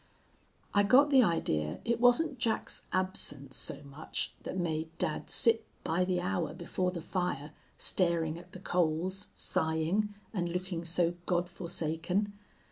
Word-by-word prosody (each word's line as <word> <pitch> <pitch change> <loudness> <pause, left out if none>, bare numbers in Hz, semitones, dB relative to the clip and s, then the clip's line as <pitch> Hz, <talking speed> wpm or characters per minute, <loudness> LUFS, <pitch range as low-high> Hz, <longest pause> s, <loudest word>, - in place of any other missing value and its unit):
"I 205 - +5
got 265 +8 +5
the 265 -2 +7
idea 80 - 0
it 235 0 +1
wasn't 255 +3 +4
Jack's 230 -2 -1
absence 185 -8 0
so 115 - +3
much 140 +2 -5
that - - -5
made 160 -2 -1
dad 160 -4 -2
sit 230 -1 +4 0.2
by 175 +3 +1
the 180 -1 0
hour 180 -2 -1
before 180 +1 -1
the 175 -3 -5
fire, 175 -6 -2 0.3
staring 170 -3 +1
at 175 +1 -15
the 185 - -8
coals, 180 +2 0
sighing, 165 +7 0 0.2
and 175 -4 -1
looking 180 -1 -3
so 170 0 +2
God 175 -1 +1
forsaken. 175 +3 -2
180 Hz, 140 wpm, -31 LUFS, 160-200 Hz, 0.3 s, the